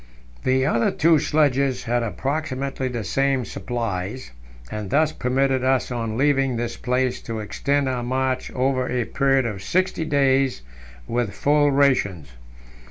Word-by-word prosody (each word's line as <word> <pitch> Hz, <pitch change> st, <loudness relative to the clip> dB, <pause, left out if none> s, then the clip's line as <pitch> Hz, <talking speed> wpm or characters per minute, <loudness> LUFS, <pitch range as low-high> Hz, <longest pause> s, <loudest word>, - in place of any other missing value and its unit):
The 130 Hz, 0 st, +2 dB
other 120 Hz, -5 st, +2 dB
two 160 Hz, 0 st, +3 dB
sledges 140 Hz, -3 st, +1 dB
had 120 Hz, 0 st, 0 dB
approximately 135 Hz, -, -3 dB
the 120 Hz, -3 st, -3 dB
same 135 Hz, +3 st, 0 dB
supplies, 115 Hz, -, -4 dB, 0.4 s
and 105 Hz, -2 st, -5 dB
thus 155 Hz, +7 st, +2 dB
permitted 130 Hz, -1 st, 0 dB
us 130 Hz, -1 st, +1 dB
on 115 Hz, -2 st, -3 dB
leaving 135 Hz, -2 st, +2 dB
this 120 Hz, 0 st, -3 dB
place 125 Hz, 0 st, -1 dB
to 115 Hz, -1 st, -5 dB
extend 140 Hz, +6 st, -1 dB
our 125 Hz, -2 st, -1 dB
march 130 Hz, +1 st, -1 dB
over 130 Hz, 0 st, 0 dB
a 125 Hz, -2 st, -1 dB
period 135 Hz, -2 st, +1 dB
of 105 Hz, -4 st, -4 dB
sixty 180 Hz, -, 0 dB
days 135 Hz, -, +1 dB, 0.4 s
with 115 Hz, -4 st, -1 dB
full 145 Hz, +7 st, +3 dB
rations. 130 Hz, -, +1 dB
130 Hz, 140 wpm, -23 LUFS, 120-140 Hz, 0.4 s, two